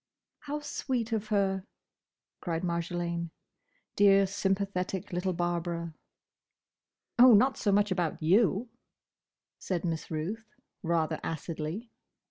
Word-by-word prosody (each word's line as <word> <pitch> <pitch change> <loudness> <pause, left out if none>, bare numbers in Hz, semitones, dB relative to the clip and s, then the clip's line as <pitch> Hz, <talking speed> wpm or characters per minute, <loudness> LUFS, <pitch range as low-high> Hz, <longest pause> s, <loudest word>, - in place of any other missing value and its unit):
"How 295 0 -5
sweet 255 -5 -2
of 220 -1 -1
her!" 195 -3 +1 0.8
cried 165 -1 -3
Marjolaine.—Dear, 175 +3 0
sympathetic 195 -2 -2
little 180 +2 0
Barbara! 170 -1 -2 1.3
"Oh! 245 -2 +9
Not 260 +6 +4
so 205 - 0
much 205 0 +3
about 175 -3 -1
you," 200 +6 +2 0.9
said 180 -2 -2
Miss 165 -2 -3
Ruth 200 +8 -5 0.3
rather 165 -3 0
acidly. 165 +7 -5
185 Hz, 100 wpm, -30 LUFS, 170-205 Hz, 1.3 s, Oh